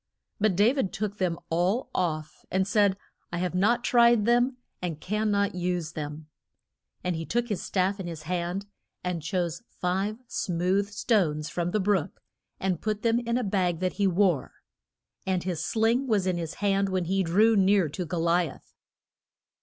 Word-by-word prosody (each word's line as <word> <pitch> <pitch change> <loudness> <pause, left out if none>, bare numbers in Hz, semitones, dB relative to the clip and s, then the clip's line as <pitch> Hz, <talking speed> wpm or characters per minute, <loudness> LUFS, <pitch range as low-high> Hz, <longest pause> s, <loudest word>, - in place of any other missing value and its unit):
But 210 -3 +2
Da 210 +7 +4
vid 265 -9 -1
took 210 0 -4
them 175 -3 0
all 180 +9 +1
off, 155 -4 -2
and 190 +1 +1
said, 205 -3 +3 0.3
I 175 - -2
have 180 0 -1
not 225 +6 +2
tried 235 -3 +5
them, 245 +2 +3 0.2
and 170 -4 -3
can 210 +5 -1
not 200 -1 +1
use 180 -2 -2
them. 150 -1 -6 0.8
And 180 -1 0
he 165 - -3
took 240 +7 -1
his 205 - -2
staff 190 +1 0
in 185 - -4
his 165 -2 -6
hand, 180 +3 -2 0.4
and 180 -2 -2
chose 170 +2 -2
five 195 +4 -1
smooth 185 0 0
stones 165 -9 +1
from 175 0 -1
the 215 - 0
brook 190 -5 0 0.4
and 185 -3 -1
put 215 -1 -2
them 230 0 +3
in 235 0 -1
a 250 - 0
bag 185 -5 0
that 185 -1 0
he 200 - +5
wore. 180 -5 +2 0.7
And 185 -2 0
his 180 -3 -2
sling 230 +4 +1
was 210 -5 +2
in 180 -2 0
his 165 +1 -5
hand 195 -1 +1
when 185 -2 0
he 190 +3 +1
drew 205 +6 +4
near 195 -2 +4
to 180 +5 -4
Go 170 0 -3
li 170 0 +2
ath. - - -15
190 Hz, 180 wpm, -27 LUFS, 175-210 Hz, 0.8 s, tried